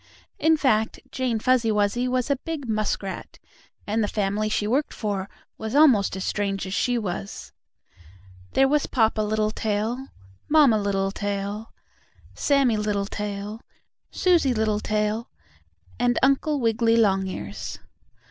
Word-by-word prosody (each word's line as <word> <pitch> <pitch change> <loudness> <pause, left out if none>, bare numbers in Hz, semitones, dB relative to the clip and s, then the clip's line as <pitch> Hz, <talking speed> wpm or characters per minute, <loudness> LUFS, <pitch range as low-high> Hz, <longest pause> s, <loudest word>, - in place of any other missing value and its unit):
In 320 0 +4
fact, 220 -6 +1
Jane 255 -4 -1
Fuzzy 240 0 +2
Wuzzy 210 +4 +1
was 255 +2 0
a - - +4
big 300 -2 -5
muskrat, 215 -3 -3 0.5
and 215 +2 0
the - - +1
family 205 +1 -1
she 215 - 0
worked 265 +8 0
for 200 -3 -3 0.3
was 220 +3 -4
almost 255 -12 +5
as 190 - -4
strange 200 -1 -1
as 190 - -5
she 245 +3 +1
was. 200 -2 -5 1.0
There 270 - +4
was 295 +1 +1
Papa 225 -3 +2
Littletail, 215 +3 -1 0.4
Mamma 290 -8 +5
Littletail, 200 +1 -2 0.6
Sammie 275 -6 +2
Littletail, 205 +1 -3 0.5
Susie 335 -9 +2
Littletail 215 0 0 0.7
and 245 0 +2
Uncle 275 +2 +2
Wiggily 230 -1 +2
Longears. 190 - -1
220 Hz, 120 wpm, -24 LUFS, 205-255 Hz, 1.0 s, almost